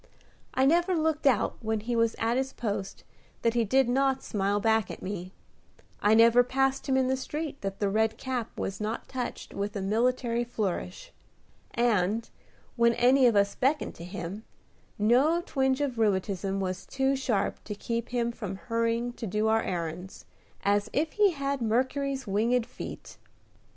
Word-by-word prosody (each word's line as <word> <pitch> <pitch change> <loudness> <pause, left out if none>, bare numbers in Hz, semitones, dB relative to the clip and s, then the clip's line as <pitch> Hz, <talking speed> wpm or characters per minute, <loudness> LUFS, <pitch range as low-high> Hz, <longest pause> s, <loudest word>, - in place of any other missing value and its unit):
I 260 - +3
never 345 +5 +3
looked 315 -2 +1
out 245 -7 +2
when 220 -1 -1
he 240 +2 -2
was 230 -1 +2
at 230 +1 0
his 265 +1 -1
post 200 -4 -4 0.4
that 230 - +3
he 235 -1 +2
did 260 +4 +3
not 265 +1 +1
smile 200 0 0
back 220 -1 +2
at - - -8
me; 185 -1 -5 0.7
I 210 +1 +4
never 230 +2 +7
passed 270 +2 0
him 265 - +3
in 260 -1 +2
the 260 - +2
street 295 +2 -5
that 195 0 -4
the 205 - +1
red 220 +2 +1
cap 250 -3 -4
was 195 +1 -4
not 215 +2 -3
touched 255 -2 -5
with 200 +1 -3
a 200 - -2
military 235 +3 +1
flourish; 200 -6 -4 0.6
and, 225 -2 +1 0.5
when 235 -1 +3
any 255 +2 +5
of 235 - +3
us 200 0 +3
beckoned 280 +4 0
to 170 - -11
him, 180 +3 -6 0.5
no 265 +11 +3
twinge 265 0 +1
of 260 -5 -2
rheumatism 195 -2 0
was 185 -1 -3
too 270 0 +1
sharp 230 -7 -1
to 210 - -5
keep 230 +3 -3
him 235 -1 0
from 205 -5 -6
hurrying 230 +3 -1
to 230 - -6
do 210 +3 0
our 225 0 +3
errands, 180 +1 -5 0.4
as 205 +1 +2
if 310 +2 0
he 420 -1 +4
had 280 -4 -2
Mercury's 260 +4 0
winged 225 +4 +1
feet. - - -9
230 Hz, 170 wpm, -28 LUFS, 205-265 Hz, 0.7 s, never